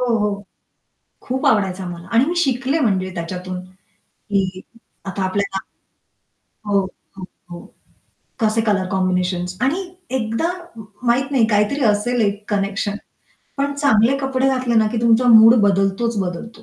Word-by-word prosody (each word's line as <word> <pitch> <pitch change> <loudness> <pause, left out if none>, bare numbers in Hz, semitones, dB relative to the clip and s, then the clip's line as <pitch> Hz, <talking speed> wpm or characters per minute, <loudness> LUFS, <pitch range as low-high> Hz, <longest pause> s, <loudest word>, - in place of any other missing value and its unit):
हो, 240 -2 +1
हो. 205 -1 -1 0.8
खूप 260 +1 -2
आवडायचा 190 -3 +1
मला. 175 0 -8
आणि 235 +3 +5
मी 340 +4 -2
शिकले 270 -2 +1
म्हणजे 190 -6 0
त्याच्यातून 180 +1 -5 0.5
की 190 -2 -3 0.4
आता 195 0 -3
आपल्याला 195 0 -1 1.1
हो, 200 -1 +4 0.4
हो, 185 - -7 0.3
हो. 175 0 -9 0.7
कसे 220 0 +2
कलर 205 -4 +1
कॉम्बिनेशन्स 180 -1 -1
आणि 300 +9 +1 0.3
एकदा 230 +8 -1 0.5
माहीत 260 +4 +1
नाही, 245 -5 +3
काहीतरी 210 +6 +1
असेल 220 +3 +1
एक 205 0 -1
कनेक्शन. 200 +1 -1 0.6
पण 280 0 -1
चांगले 275 -3 +3
कपडे 270 -1 0
घातले 255 -3 0
ना 220 -1 +4
की 230 - -1
तुमचा 235 +1 +3
मूड 225 0 +8
बदलतोच 200 +3 +1
बदलतो. 205 +5 -5
215 Hz, 135 wpm, -20 LUFS, 195-245 Hz, 1.1 s, मूड